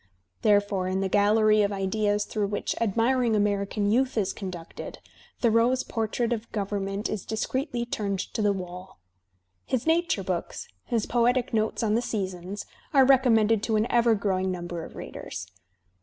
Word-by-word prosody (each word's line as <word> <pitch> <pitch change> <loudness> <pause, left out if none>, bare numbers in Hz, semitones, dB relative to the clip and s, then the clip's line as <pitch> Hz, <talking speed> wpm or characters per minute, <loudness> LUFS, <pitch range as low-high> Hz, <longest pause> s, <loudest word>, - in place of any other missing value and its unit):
Therefore 205 -3 +2
in 190 +1 -1
the 195 - +1
gallery 215 +2 +4
of 205 0 +1
ideas 205 +1 0
through 210 -2 -1
which 205 0 -2
admiring 230 +2 +2
American 205 0 0
youth 255 +2 +1
is 200 -3 +1
conducted, 180 -5 -7 0.4
Thoreau's 235 +2 +3
portrait 230 +1 -1
of 230 0 -6
government 200 0 -2
is 210 - -4
discreetly 240 +2 -2
turned 205 -4 -2 0.2
to - - -1
the 205 -1 +3
wall. 185 -1 -7 0.7
His 255 -3 -2
nature 340 +2 +2
books, - - -4 0.2
his 230 -4 0
poetic 245 +1 +1
notes 220 +1 0
on 215 -2 +2
the 230 - +2
seasons, 190 -3 -4 0.3
are 270 -1 +7
recom 260 -2 +5
mended 220 -1 +3
to 220 0 0
an 215 +1 +2
ever 235 -1 +4
growing 190 -2 0
number 175 -2 -4
of - - -10
readers. - - -7
215 Hz, 155 wpm, -26 LUFS, 195-235 Hz, 0.7 s, are